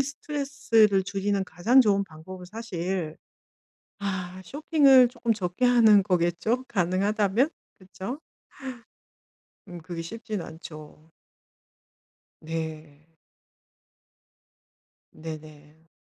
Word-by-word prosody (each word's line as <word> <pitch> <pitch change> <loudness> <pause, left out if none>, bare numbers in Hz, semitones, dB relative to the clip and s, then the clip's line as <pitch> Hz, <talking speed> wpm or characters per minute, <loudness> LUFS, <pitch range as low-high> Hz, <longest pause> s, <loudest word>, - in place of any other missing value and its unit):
스트레스를 270 -8 +1
줄이는 195 0 -1
가장 220 +11 +4
좋은 200 -4 +3
방법은 180 +3 -11
사실 180 -5 -4 0.8
아 185 -2 -4
쇼핑을 275 - +5
쪼끔 235 -2 -1
적게 185 +4 -1
하는 225 -4 +6
거겠죠? 180 +6 0
가능하다면? 205 - +1 0.3
그쵸? 195 +8 -7 1.5
음 175 -1 -8
그게 165 0 -6
쉽진 215 +2 -5
않죠. 155 -1 -11 1.3
네. 155 -2 -6 2.1
네네. 155 0 -11
190 Hz, 175 characters per minute, -26 LUFS, 165-230 Hz, 2.1 s, 하는